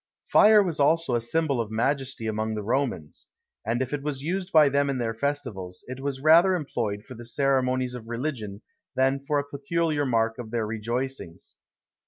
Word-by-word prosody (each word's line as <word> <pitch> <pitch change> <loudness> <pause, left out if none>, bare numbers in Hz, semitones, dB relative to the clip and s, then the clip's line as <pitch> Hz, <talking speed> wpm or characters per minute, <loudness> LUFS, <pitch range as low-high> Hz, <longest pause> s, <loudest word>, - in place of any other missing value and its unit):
Fire 210 -1 +6
was 170 -6 -3
also 160 -1 +3
a 120 - +1
symbol 140 +1 0
of 110 - -5
majesty 130 +1 -1
amongst 110 0 -2
the 105 - -4
Romans; 115 - -2 0.4
and 120 +4 0
if 130 - -7
it 145 - -2
was 140 -2 -4
used 185 +3 -2
by 155 -2 +7
them 140 0 +1
in 135 - -1
their 115 -2 -1
festivals, 115 -9 -4
it 130 +1 -7
was 135 -1 -4
rather 170 +4 +6
employed 115 - -3
for 130 - -10
the 120 -1 -10
ceremonies 130 0 +1
of 120 -2 -8
religion 115 -5 -4 0.3
than 135 +1 +2
for 140 +2 -1
a 140 - +1
peculiar 145 +2 -1
mark 115 -1 +1
of 115 -3 -6
their 115 -1 -1
rejoicings. 115 -2 -5
130 Hz, 185 wpm, -26 LUFS, 115-145 Hz, 0.4 s, by